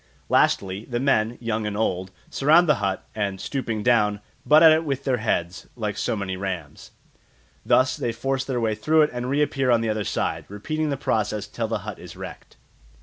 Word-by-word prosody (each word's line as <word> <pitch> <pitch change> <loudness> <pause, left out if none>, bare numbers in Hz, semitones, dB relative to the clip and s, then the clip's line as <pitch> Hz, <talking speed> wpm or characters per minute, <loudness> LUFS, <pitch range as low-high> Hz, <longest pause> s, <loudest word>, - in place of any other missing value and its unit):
Lastly, 95 +2 +2
the 120 -2 -3
men, 120 -4 +1
young 110 -2 -2
and 105 -1 -3
old, 95 -4 -1 0.2
surround 160 +5 +4
the 150 - +6
hut, 95 -1 -2
and, 100 -3 -2
stooping 115 -5 -3
down, 105 -4 +3 0.2
butt 155 +2 +6
at 160 - +9
it 160 +1 +3
with 140 -3 -3
their 130 -3 +1
heads, 90 -5 -2
like 105 -4 -3
so - - -1
many 95 -3 -3
rams. 90 -6 -6 0.7
Thus 130 0 +3
they 120 - -1
force 130 +3 -2
their 130 -2 -2
way 110 -2 +1
through 155 +9 +3
it 150 - 0
and 125 +1 -3
reappear 140 -2 +1
on 120 -2 +4
the 115 - -1
other 110 -1 -1
side, - - -2
repeating 155 +10 -3
the 140 - -1
process 105 -4 -1
till 110 +2 -4
the 110 -1 -2
hut 105 -3 -6
is - - -11
wrecked. - - -10
115 Hz, 200 wpm, -24 LUFS, 105-135 Hz, 0.7 s, at